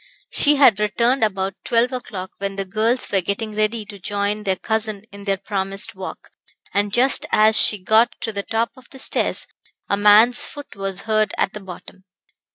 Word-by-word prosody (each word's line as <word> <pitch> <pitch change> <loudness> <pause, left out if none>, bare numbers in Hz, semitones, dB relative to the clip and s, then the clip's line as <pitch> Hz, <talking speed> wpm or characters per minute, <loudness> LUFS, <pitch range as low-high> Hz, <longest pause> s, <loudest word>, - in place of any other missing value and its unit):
She 295 +1 +3
had 250 -8 +5
returned 235 +4 +1
about 195 -2 -1
twelve 240 +2 +1
o'clock, 200 -7 -6
when 195 0 -3
the 195 0 -3
girls 220 +6 0
were 195 - +2
getting 205 +4 -3
ready 215 +1 -1
to 200 -1 -11
join 205 +2 -2
their 190 -1 +2
cousin 215 0 -2
in 200 0 -11
their 195 -1 0
promised 195 +2 -3
walk, 190 -1 -9 0.4
and 205 0 0
just 255 +5 +2
as 215 +1 +4
she 210 - +4
got 220 +5 +3
to 225 - -3
the 200 - -2
top 225 +3 -1
of 260 -2 -18
the 270 - -12
stairs, - - +2 0.4
a 200 - 0
man's 210 +4 +6
foot 290 -1 -8
was 195 -1 -4
heard 215 -1 0
at - - 0
the 210 - -6
bottom. 190 0 -12
210 Hz, 185 wpm, -21 LUFS, 195-225 Hz, 0.4 s, man's